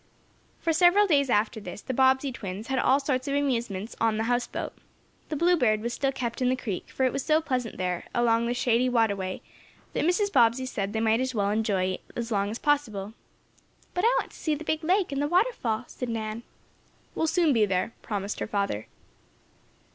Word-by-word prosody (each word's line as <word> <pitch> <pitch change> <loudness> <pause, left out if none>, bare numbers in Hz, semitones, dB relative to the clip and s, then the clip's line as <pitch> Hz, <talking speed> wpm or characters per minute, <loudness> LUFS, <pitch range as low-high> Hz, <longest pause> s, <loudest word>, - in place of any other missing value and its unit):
For 330 - 0
several 355 +5 +5
days 285 -7 +3
after 220 0 +1
this, 210 - -8
the 260 - -5
Bobbsey 265 +1 +3
twins 210 -1 -6
had 265 -1 +1
all 265 +2 +4
sorts 270 -2 -1
of 280 - 0
amusements 235 -7 -1
on 225 -1 +2
the 220 - 0
house 245 +1 0
boat. - - -5 0.6
The 310 - -2
BLUEBIRD 295 -10 +3
was 235 +1 -3
still 275 +1 0
kept 240 -2 -4
in 250 - +3
the 255 - +2
creek, 215 -7 -5
for 265 - -2
it 255 - +1
was 275 - -2
so 310 0 +3
pleasant 255 -7 -3
there, 180 -1 -2
along 235 -1 +2
the 240 - -1
shady 245 0 +2
waterway, 200 -6 0 0.5
that - - 0
Mrs. 380 +5 +1
Bobbsey 240 +1 +4
said 205 -5 -3
they 220 - 0
might 225 +1 +2
as 260 -1 -2
well 200 -1 +1
enjoy 210 -4 +1
it 185 - -5
as 235 0 -4
long 200 -1 +1
as 220 - -4
possible. 225 -9 0 0.8
"But 360 - -1
I 475 +2 +4
want - - -5
to - - -14
see 310 -2 0
the 305 - -7
big 315 0 -1
lake 370 +1 +2
and 275 0 -1
the 290 - +1
waterfall," 350 - +1
said 250 0 -6
Nan. 220 0 -3 0.7
"We'll 320 - 0
soon 330 -2 +3
be 220 -3 +3
there," 190 +4 -1
promised 205 -2 -4
her - - -3
father. 200 - -2
245 Hz, 210 wpm, -27 LUFS, 215-285 Hz, 0.8 s, several